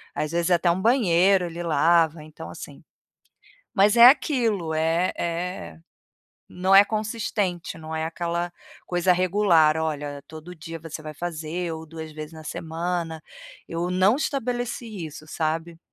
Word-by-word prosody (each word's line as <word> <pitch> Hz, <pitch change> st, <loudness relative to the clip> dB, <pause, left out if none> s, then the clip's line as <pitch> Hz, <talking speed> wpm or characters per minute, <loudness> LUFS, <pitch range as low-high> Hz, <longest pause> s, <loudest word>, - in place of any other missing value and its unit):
às 150 Hz, 0 st, -2 dB
vezes 170 Hz, +1 st, 0 dB
até 175 Hz, 0 st, +3 dB
um 180 Hz, +2 st, -1 dB
banheiro 195 Hz, -5 st, +4 dB
ele 170 Hz, 0 st, -6 dB
lava, 165 Hz, 0 st, +3 dB
então, 155 Hz, 0 st, -10 dB
assim. -, -, -10 dB, 0.9 s
Mas 205 Hz, +2 st, +4 dB
é 235 Hz, -, +10 dB
aquilo: 235 Hz, -, +2 dB
eh 165 Hz, +3 st, +1 dB
eh, 170 Hz, -, -4 dB, 0.7 s
não 185 Hz, +2 st, +1 dB
é 200 Hz, +1 st, +9 dB
consistente, 210 Hz, -5 st, -2 dB
não 160 Hz, 0 st, -7 dB
é 160 Hz, 0 st, -1 dB
aquela 170 Hz, +1 st, -3 dB, 0.3 s
coisa 175 Hz, +1 st, +2 dB
regular. 180 Hz, -4 st, +3 dB
Olha, 145 Hz, -3 st, -3 dB
todo 160 Hz, +3 st, -10 dB
dia 165 Hz, 0 st, -8 dB
você 160 Hz, -1 st, -8 dB
vai 155 Hz, 0 st, -7 dB
fazer, 170 Hz, +1 st, -4 dB
ou 160 Hz, 0 st, -7 dB
2 160 Hz, 0 st, -8 dB
vezes 155 Hz, +1 st, -8 dB
na 160 Hz, -1 st, -11 dB
semana. 165 Hz, +1 st, -4 dB, 0.5 s
Eu 170 Hz, +2 st, -2 dB
não 185 Hz, +5 st, +3 dB
estabeleci 245 Hz, -, -3 dB
isso, 155 Hz, 0 st, -11 dB
sabe? 165 Hz, +1 st, -3 dB
170 Hz, 145 wpm, -24 LUFS, 160-185 Hz, 0.9 s, é